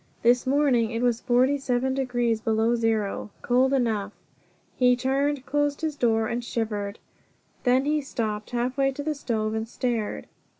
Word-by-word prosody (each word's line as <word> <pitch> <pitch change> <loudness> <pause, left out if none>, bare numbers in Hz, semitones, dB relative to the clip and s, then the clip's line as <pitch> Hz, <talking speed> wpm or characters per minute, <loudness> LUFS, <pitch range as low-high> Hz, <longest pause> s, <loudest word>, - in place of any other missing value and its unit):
This 240 +2 +3
morning 265 -5 +3
it 230 +1 -2
was 240 -2 +1
forty 255 +4 +2
seven 260 0 0
degrees 245 -4 0
below 225 +1 +1
zero. 220 -3 -1
Cold 255 +2 +3
enough! 220 -6 0 0.6
He 250 -1 +4
turned, 270 +2 0
closed 290 0 0
the 320 -1 0
door, 235 -3 0
shivered. 215 -3 -3 0.7
Then 255 +2 +3
he 300 +1 +1
stopped 215 -6 -3
halfway 255 +3 0
to 285 - -5
the 310 +1 -1
stove, 220 -6 -2
and 220 0 -2
stared. 235 -4 -2
245 Hz, 145 wpm, -25 LUFS, 225-270 Hz, 0.7 s, He